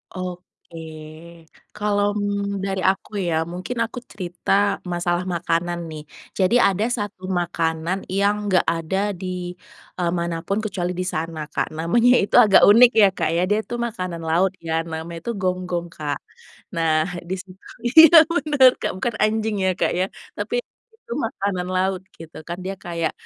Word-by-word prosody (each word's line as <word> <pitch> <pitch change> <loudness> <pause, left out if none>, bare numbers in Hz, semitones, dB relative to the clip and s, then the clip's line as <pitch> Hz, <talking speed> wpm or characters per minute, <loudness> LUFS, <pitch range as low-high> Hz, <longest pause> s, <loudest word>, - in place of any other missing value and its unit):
Oke. 180 -2 -8 1.0
Kalau 205 -1 +1 0.6
dari 195 -1 -2
aku 195 0 -2 0.2
ya, 165 - 0 0.2
mungkin 185 +8 -5
aku 240 +2 -7
cerita 180 -2 -5 0.4
masalah 175 +1 0
makanan 170 +1 -1
nih, 155 -1 -7 0.4
jadi 190 +5 +3
ada 195 +2 0
satu 205 -3 -5 0.2
makanan 165 +1 -1 0.2
yang 205 +1 +3 0.2
gak 185 - +3
ada 165 +3 -3 0.2
di, 185 - -5 0.7
eee, 170 -1 +1
manapun 170 +3 -2
kecuali 180 -4 -2
di 185 - -3
sana 160 0 -3
Kak, - - 0
namanya 230 +10 +3
itu 200 - -1
agak 210 -3 +6
unik 240 +3 +8
ya 200 - +8
Kak - - 0
ya, 175 - +2
dia 210 - +2
itu 240 - -6
makanan 185 -7 -5
laut 180 +4 +3 0.2
ya, - - -2 0.2
namanya 165 +1 -6
itu 235 - -2
gonggong 180 -2 -1
Kak. 145 -2 -3 0.6
Nah 165 -1 +2 0.3
dis 190 0 -3 0.5
iya 320 +6 +9 0.2
bener 290 -4 +5
Kak - - -1
bukan 230 +3 -2
anjing 215 0 0
ya 190 - +3
Kak - - +2
ya, 185 - +2 0.3
tapi 485 - -3 0.4
itu 465 +1 -9
makanan 195 -4 -3
laut 185 0 0 0.2
gitu, 165 -1 -12
kan 175 - -4
dia 195 +1 -3
kayak, 170 -2 -2
185 Hz, 150 wpm, -22 LUFS, 170-205 Hz, 1.0 s, iya